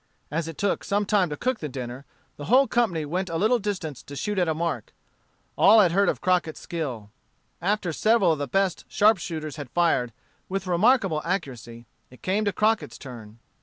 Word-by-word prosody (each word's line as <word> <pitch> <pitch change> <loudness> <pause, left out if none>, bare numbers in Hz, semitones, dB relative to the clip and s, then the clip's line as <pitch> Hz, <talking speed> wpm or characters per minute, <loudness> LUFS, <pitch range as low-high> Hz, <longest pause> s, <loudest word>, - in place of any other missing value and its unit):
As 160 +1 -2
it 165 - -7
took 200 -1 0
some 205 +1 0
time 200 -4 +2
to 150 - -5
cook 255 -1 -1
the 150 - -5
dinner, 130 +1 -7 0.3
the 145 - -7
whole 255 - +5
company 190 -11 0
went 180 +5 -2
to 165 - -4
a - - +1
little 220 +7 +3
distance 185 - -4
to 145 - -10
shoot 205 +6 -2
at 180 - +2
a 160 - 0
mark. 160 -8 -3 0.6
All 220 +3 +7
had 185 -5 +5
heard 200 +3 +3
of - - -2
Crockett's 180 -4 0
skill. 130 -11 -5 0.5
After 190 -2 0
several 215 -1 +3
of 155 - -1
the 145 - -2
best 195 +3 0
sharpshooters 170 -8 +1
had 145 -4 -7
fired, 165 -8 +1 0.4
with 195 0 -3
remarkable 185 -2 +3
accuracy, 125 - -4 0.2
it 125 - -18
came 205 +3 0
to 205 - +2
Crockett's 220 +2 0
turn. 115 -5 -11
175 Hz, 195 wpm, -25 LUFS, 145-205 Hz, 0.6 s, All